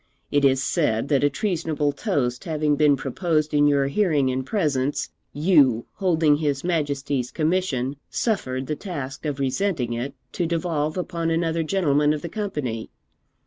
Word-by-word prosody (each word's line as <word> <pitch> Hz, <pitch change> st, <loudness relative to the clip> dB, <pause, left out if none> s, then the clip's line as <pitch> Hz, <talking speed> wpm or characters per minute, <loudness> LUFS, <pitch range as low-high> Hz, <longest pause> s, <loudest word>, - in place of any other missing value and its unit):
It 145 Hz, 0 st, +2 dB
is 135 Hz, -1 st, +4 dB
said 140 Hz, -6 st, 0 dB
that 140 Hz, -2 st, +2 dB
a 145 Hz, -, +5 dB
treasonable 160 Hz, -4 st, -1 dB
toast 125 Hz, -3 st, -1 dB
having 155 Hz, -3 st, +1 dB
been 150 Hz, -1 st, +4 dB
proposed 155 Hz, +3 st, -1 dB
in 145 Hz, 0 st, +5 dB
your 140 Hz, -1 st, +3 dB
hearing 145 Hz, -4 st, +2 dB
and 130 Hz, +1 st, -2 dB
presence, 145 Hz, -5 st, -1 dB, 0.2 s
you, 145 Hz, -8 st, +3 dB
holding 160 Hz, -6 st, +2 dB
his 145 Hz, -3 st, -1 dB
Majesty's 145 Hz, -6 st, -1 dB
commission, 155 Hz, -5 st, 0 dB
suffered 130 Hz, -, -1 dB
the 150 Hz, -, -2 dB
task 145 Hz, -6 st, -6 dB
of 145 Hz, -2 st, -3 dB
resenting 135 Hz, -2 st, 0 dB
it 130 Hz, +4 st, -4 dB, 0.2 s
to 175 Hz, -, -1 dB
devolve 160 Hz, -2 st, -1 dB
upon 170 Hz, -2 st, -2 dB
another 165 Hz, 0 st, 0 dB
gentleman 150 Hz, -4 st, +2 dB
of 150 Hz, -, -5 dB
the 170 Hz, -, -4 dB
company. 150 Hz, -, -3 dB
150 Hz, 150 wpm, -24 LUFS, 135-165 Hz, 0.2 s, a